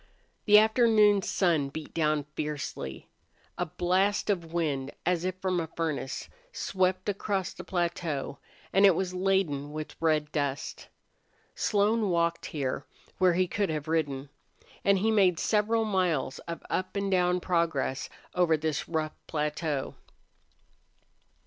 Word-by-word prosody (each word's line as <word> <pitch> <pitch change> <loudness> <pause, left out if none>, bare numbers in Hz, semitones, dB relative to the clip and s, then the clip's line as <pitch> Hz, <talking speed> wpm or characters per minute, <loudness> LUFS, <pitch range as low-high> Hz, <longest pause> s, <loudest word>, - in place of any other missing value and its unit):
The 210 -1 +8
afternoon 215 -2 +5
sun 165 -7 +1
beat 155 +2 -8
down 155 -2 +1
fiercely. 145 - -4 0.5
A 180 - -2
blast 190 +6 +1
of 170 -4 -3
wind, 145 -5 -1
as 175 -1 +1
if 185 -1 -1
from 185 -1 0
a 165 - -2
furnace, 155 -5 -3 0.2
swept 185 - 0
across 200 -2 -1
the 180 - -9
plateau, 170 -6 -2 0.3
and 195 - +5
it 190 - +5
was 185 +1 -2
laden 180 -7 0
with 155 0 -6
red 155 -2 +1
dust. 145 -1 -3 0.7
Slone 210 0 +2
walked 170 -1 0
here, 135 -4 -3 0.4
where 185 -1 +5
he 185 +1 +2
could 200 +1 -1
have 155 -1 -3
ridden. 145 -4 -1 0.5
And 200 0 +4
he 220 +4 +2
made 190 -5 +4
several 220 +3 +2
miles 180 -10 0
of 170 0 -5
up 185 +2 -2
and 200 0 -1
down 180 -1 +3
progress 165 -7 0 0.2
over 175 -3 +3
this 155 0 -2
rough 155 -2 -1
plateau. 150 -2 -2
170 Hz, 135 wpm, -29 LUFS, 155-190 Hz, 0.7 s, The